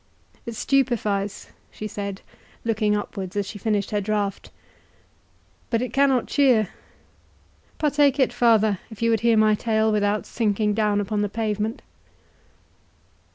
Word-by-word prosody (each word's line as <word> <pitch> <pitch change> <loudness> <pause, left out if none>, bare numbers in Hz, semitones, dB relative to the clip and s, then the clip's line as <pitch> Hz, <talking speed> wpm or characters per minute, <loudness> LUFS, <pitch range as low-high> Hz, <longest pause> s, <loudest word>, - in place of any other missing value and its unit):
"It 235 - -5
stupifies," 215 -7 0 0.2
she 215 - -8
said, 200 -1 -5 0.4
looking 215 -2 +1
upwards 195 -2 -6
as 205 -1 0
she 205 +2 -8
finished 210 -1 -1
her 210 -1 0
drought, 205 -1 -2 1.2
"but 230 - +1
it 250 +1 -4
cannot 270 -3 +3
cheer—Partake 280 - -1
it, 260 - +2
father, 220 -4 +3
if 220 -1 -7
you 230 - +3
would 225 - +2
hear 230 0 +3
my 215 0 +5
tale 220 0 +1
without 205 0 0
sinking 210 -2 0
down 210 -1 +1
upon 205 +1 -2
the 205 - 0
pavement." 215 0 -2
215 Hz, 130 wpm, -23 LUFS, 205-230 Hz, 1.2 s, my